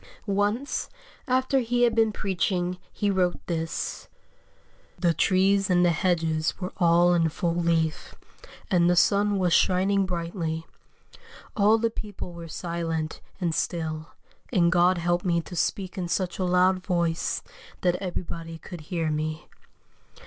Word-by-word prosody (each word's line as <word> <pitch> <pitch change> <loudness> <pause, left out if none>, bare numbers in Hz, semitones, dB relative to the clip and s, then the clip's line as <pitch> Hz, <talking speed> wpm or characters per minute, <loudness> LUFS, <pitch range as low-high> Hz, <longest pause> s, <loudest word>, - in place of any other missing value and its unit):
Once, 205 +6 -1 0.4
after 260 +1 +2
he 245 0 +1
had 240 - +4
been 225 -1 +3
preaching, 185 -3 -1
he 205 -1 0
wrote 180 -2 +1
this: 165 -2 -3 0.9
"The 170 -2 +2
trees 195 +4 +2
and 180 -1 +4
the 175 - +4
hedges 165 -2 0
were 185 0 -5
all 175 0 +4
in 165 -2 +3
full 170 +2 -1
leaf, 165 -2 0 0.6
and 175 -2 +4
the 180 - +4
sun 205 +3 +3
was 180 -3 +2
shining 190 +2 +3
brightly. 170 -2 -3 0.9
All 210 +1 +5
the 230 0 0
people 205 -5 -7
were 170 -1 -8
silent 165 -1 -3 0.2
and 170 -3 0
still, 160 -1 -2 0.4
and 175 -6 +3
God 180 0 +4
helped 175 +1 0
me 170 -2 +2
to 175 - -10
speak 190 +3 -2
in 175 - -2
such 175 +1 -2
a 185 - +1
loud 180 +1 +3
voice 170 -3 -1 0.4
that 180 -1 +2
everybody 165 -3 -5
could 175 0 -9
hear 160 0 -2
me. 155 +1 -3
175 Hz, 140 wpm, -26 LUFS, 165-195 Hz, 0.9 s, All